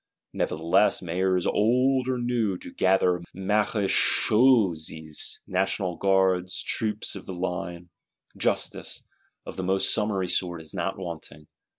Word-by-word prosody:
Nevertheless, 85 +6 +1
Mayors 90 +1 0
old 125 +4 +2
or 130 -1 0
new 120 -6 0
do 90 - -11
gather 90 -1 +2
Marechaussées, 100 - +1
National 95 -1 -1
Guards, 95 -1 +1
Troops 105 -2 -1
of 100 - -9
the 95 - -5
line; 90 -1 -4 0.4
justice, - - -2 0.4
of - - -8
the 95 - -3
most 95 +1 +2
summary 105 -4 0
sort, 90 -1 -1
is 80 -1 -5
not 95 0 -2
wanting. 80 -4 -8
95 Hz, 115 wpm, -26 LUFS, 90-105 Hz, 0.4 s, old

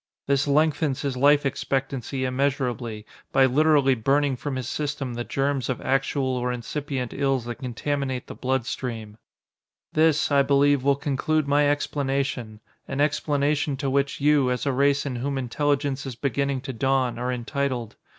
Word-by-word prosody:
This 140 +1 +1
lengthens 150 -1 +1
his 140 -2 -1
life 145 +3 +4
expectancy 135 -1 -2
immeasurably, 125 -4 -1 0.3
by 135 - +5
literally 140 0 +4
burning 135 +3 +1
from 135 +2 -4
his 130 -2 -4
system 140 -3 -3
the 120 0 -3
germs 135 0 -1
of 130 - -1
actual 135 +1 0
or 125 0 -1
incipient 130 0 -4
ills 135 -3 0
that 120 -2 -6
contaminate 130 +1 -3
the - - -8
blood 130 -2 -1
stream. 110 -4 -5 0.8
"This, 155 -1 +3
I 140 -1 +5
believe, 140 -1 +3
will 140 0 +4
conclude 145 +1 0
my 145 0 +3
explanation, 135 -6 -2 0.3
an 135 - -4
explanation 145 -1 +1
to 135 -2 -2
which 140 +1 0
you, 145 -2 +3
as 125 +2 -1
a 140 - +2
race 140 +2 +2
in 130 -3 -3
whom 135 +3 -2
intelligence 140 +1 -1
is 130 - -5
beginning 140 +1 -1
to 135 0 -6
dawn, 130 -1 0
are 125 +1 -1
entitled. 125 -1 -3
135 Hz, 160 wpm, -25 LUFS, 125-145 Hz, 0.8 s, by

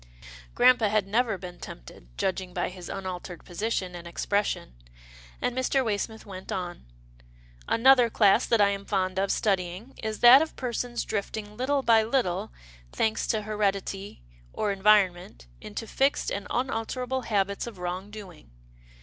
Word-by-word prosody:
Grampa 245 -3 +5
had 210 -1 +1
never 220 +1 +1
been 180 -1 -9
tempted, - - -11
judging 185 -1 -2
by 175 - -1
his 180 -1 -10
unaltered 185 -2 -6
position, 185 0 -2
and 175 -1 -8
expression, 200 - -1 0.7
and 245 - -1
Mr. 260 +1 +1
Way 205 -2 0
smith 220 0 -5
went 190 -2 -9
on, 175 - -5 0.4
" - - -27
Another 250 0 +5
class 215 +1 +4
that 230 - +3
I 205 -1 +5
am 200 0 -3
fond 190 -2 -1
of 195 0 +1
studying 190 +4 -1
is 220 -1 -4
that 245 +3 +9
of 320 - -3
persons 245 -1 -3
drifting 210 0 -4
little 275 +3 0
by 225 -2 +5
little, 220 - -1 0.4
thanks 220 0 0
to 215 -2 0
heredity 200 - -2 0.3
or 210 - -1
environment, 190 - +2 0.2
into 225 - -6
fixed 270 +5 +1
and 200 - -4
unalterable 250 +1 -2
habits 200 -1 0
of 225 -5 -8
wrong 180 +2 -4
doing. 195 - -11
205 Hz, 150 wpm, -27 LUFS, 185-230 Hz, 0.7 s, that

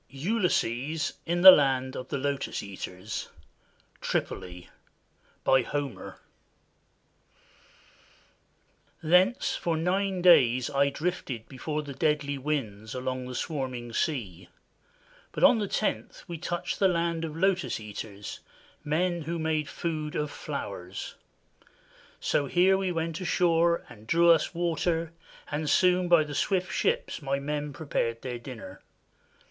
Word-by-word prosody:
ULYSSES 155 - 0
IN 175 +1 0
THE 190 - +14
LAND 130 -5 +2
OF 125 - -6
THE 140 - -2
LOTUS 140 0 -2
EATERS 95 0 -6 0.7
(TRIPOLI) 90 -1 -3 0.8
BY 130 0 +5
HOMER 140 0 -5 2.9
Thence 180 +9 +3
for 165 -2 -1
nine 185 +2 0
days 130 -8 +5
I 140 0 +3
drifted 140 -7 -4
before 150 +3 -4
the 140 -1 -7
deadly 145 0 0
winds 115 -7 -3
along 130 0 -3
the 125 - -6
swarming 130 -6 -4
sea; 95 - -2 0.8
but - - -3
on 240 - +7
the 205 - -1
tenth 215 - -2
we 170 -3 -6
touched 175 +1 -3
the 195 - +5
land 170 -2 0
of 160 -1 -5
Lotus 180 -9 +1
Eaters, 105 -1 -7 0.4
men 170 +3 0
who 165 +2 -3
made 160 -2 -1
food 155 -3 -3
of 150 -1 -1
flowers. 90 +2 -6 1.1
So 145 - 0
here 180 +5 +4
we 190 -1 -1
went 165 0 -3
ashore 170 -1 +2
and 110 0 -14
drew 170 +5 +5
us 165 +1 +2
water, 170 -1 -1 0.4
and 150 +1 -1
soon 180 -1 +4
by 170 -2 +6
the 150 -1 -7
swift 185 +3 0
ships - - 0
my 140 -1 -1
men 145 +1 -3
prepared 125 -5 -2
their 125 -2 -4
dinner. 115 -7 -9
150 Hz, 125 wpm, -28 LUFS, 130-170 Hz, 2.9 s, THE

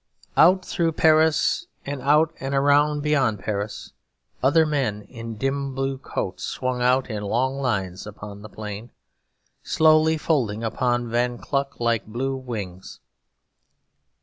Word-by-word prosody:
Out 185 +3 +5
through 165 -3 0
Paris 160 - +3 0.2
and 140 -1 -4
out 150 +4 +3
and 135 +1 -3
around 145 +2 +3
beyond 135 -8 +2
Paris, 105 +1 -4 0.5
other 150 +5 +4
men 130 -9 -1
in 115 +1 -8
dim 135 +1 -2
blue 135 0 -2
coats - - -4
swung 125 -1 -2
out 125 +1 +3
in 105 -1 -3
long 130 +6 0
lines 95 -7 -2
upon 100 0 -9
the 110 - -10
plain, 105 +2 -7 0.7
slowly 160 0 +4
folding 120 -9 0
upon 120 +1 -1
Von 120 +1 0
Kluck 140 +2 -3
like 115 -2 0
blue 130 +5 -2
wings. 105 -8 -7
130 Hz, 130 wpm, -24 LUFS, 110-145 Hz, 0.7 s, Out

